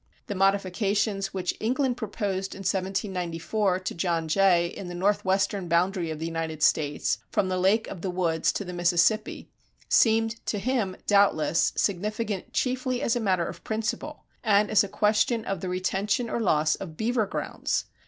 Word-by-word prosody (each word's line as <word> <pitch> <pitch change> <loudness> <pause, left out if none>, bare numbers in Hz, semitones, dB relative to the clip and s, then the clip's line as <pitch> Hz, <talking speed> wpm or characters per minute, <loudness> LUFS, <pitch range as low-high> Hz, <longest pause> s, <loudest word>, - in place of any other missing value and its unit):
The - - -4
modifications 195 +1 +1
which 185 -2 -2
England 255 +2 0
proposed 200 -4 -3
in - - -8
1794 190 0 -1
to 185 - -4
John 165 -1 -1
Jay 175 +1 +4
in 180 +2 -6
the 175 - -6
northwestern 195 0 +1
boundary 170 +1 +1
of 155 - -4
the 160 - -4
United 165 -2 -3
States 145 -2 +1
from 190 - 0
the 185 0 -1
Lake 200 +5 +2
of 185 - -7
the 190 - -2
Woods 170 -3 +1
to 200 - -3
the 180 - -6
Mississippi, 175 +5 +1 0.4
seemed 225 0 +3
to 210 - 0
him, 215 -4 -1
doubtless, 170 -6 +3
significant 210 +1 -2
chiefly 255 -1 -1
as 230 - +1
a - - 0
matter 185 -6 +1
of - - -8
principle 225 +7 -3 0.2
and 210 -2 +3
as 215 0 +5
a - - -3
question 220 +3 +1
of 195 -3 -3
the 185 - -3
retention 195 +5 -1
or - - -1
loss 155 -7 +2
of 165 -5 -7
beaver 225 -1 0
grounds. - - -2
195 Hz, 165 wpm, -26 LUFS, 175-215 Hz, 0.4 s, as